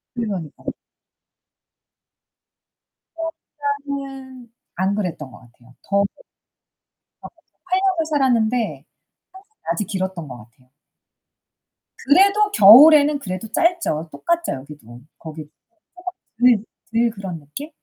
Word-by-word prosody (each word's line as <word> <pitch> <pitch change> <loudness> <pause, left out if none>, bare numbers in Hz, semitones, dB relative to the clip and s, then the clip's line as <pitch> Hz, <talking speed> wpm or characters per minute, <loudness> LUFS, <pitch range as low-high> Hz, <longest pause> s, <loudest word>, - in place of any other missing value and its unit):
그러니까. 195 -10 -5 2.5
어 330 0 -3 0.5
플로리다는 270 -4 -8 0.2
안 190 +3 0
그랬던 170 -9 -4
것 - - -14
같아요. 125 +1 -22
더워도 200 0 +1 1.1
거기서 - - -16
8 370 +1 0
년을 370 -5 0
살았는데 235 - 0 0.5
항상 405 +3 -18
낮이 170 +5 -1
길었던 190 -6 -4
것 125 - -8
같아요. 120 +3 -19 1.4
그래도 400 +8 +4
겨울에는 290 - +8
그래도 185 -1 -6
짧죠. 335 - 0
똑같죠, 340 - -1
여기도. 130 -3 -11 0.2
거기도 155 -2 -10 0.5
해가 365 0 -6 0.5
들 210 - -12 0.3
들 230 0 +2
그런 190 -6 -7
느낌? 150 - -9
220 Hz, 235 characters per minute, -21 LUFS, -, 2.5 s, 겨울에는